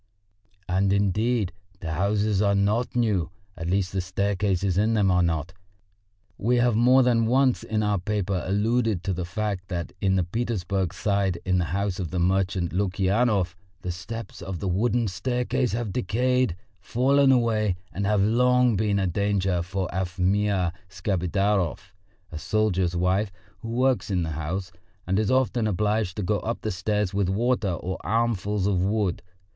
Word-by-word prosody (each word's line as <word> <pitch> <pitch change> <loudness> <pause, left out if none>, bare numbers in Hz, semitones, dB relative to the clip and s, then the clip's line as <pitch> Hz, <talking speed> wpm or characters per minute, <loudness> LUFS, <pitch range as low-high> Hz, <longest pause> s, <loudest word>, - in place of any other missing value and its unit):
And, 95 +2 +1
indeed, 100 +1 +1 0.3
the 80 - -5
houses 100 +3 +1
are 100 -1 +3
not 105 +6 +1
new, 105 -8 +1 0.3
at 85 0 -4
least 95 -1 0
the 95 - 0
staircases 95 0 0
in 110 +4 +2
them 100 -3 +3
are 90 0 +3
not. 80 -1 -1 0.9
We 120 +4 +2
have 120 -2 +3
more 125 +3 +5
than 115 -2 +2
once 130 +1 +3
in 110 -1 -1
our 105 -2 +1
paper 100 -1 -1
alluded 105 0 0
to 95 - -1
the 90 0 -3
fact 95 +1 -3
that 85 -3 -4
in 95 -1 +2
the 95 - +2
Petersburg 95 -3 -2
Side 100 -3 0
in 90 -1 +2
the 85 - +1
house 100 +3 -2
of 90 -4 -3
the 90 - -4
merchant 95 -1 0
Lukyanov 95 +1 +1 0.3
the 90 - -2
steps 110 +5 -7
of 90 +1 -5
the 95 - -4
wooden 115 +5 +1
staircase 125 +6 -1
have 115 -4 -2
decayed, 125 -3 +1 0.2
fallen 135 +3 +3
away, 110 -6 +2 0.2
and 100 0 -2
have 105 -1 +2
long 125 +2 +3
been 105 0 +1
a 95 - +1
danger 95 -1 0
for 95 +1 -3
Afimya 95 0 0 0.2
Skapidarov, 95 0 -1 0.4
a 80 - -6
soldier's 95 -2 0
wife 95 +4 +1 0.3
who 115 - -7
works 125 0 +1
in 90 -3 0
the 80 - -3
house, 85 +5 -4 0.3
and 95 +2 +1
is 110 -2 0
often 130 -3 +2
obliged 105 -1 0
to 105 - -2
go 105 +3 0
up 115 +1 -4
the 110 - -2
stairs 100 +2 -1
with 100 -2 +1
water 110 -1 +1
or 90 +2 -4
armfuls 105 -3 0
of 95 -3 +1
wood. 100 -1 0
100 Hz, 165 wpm, -25 LUFS, 90-110 Hz, 0.9 s, more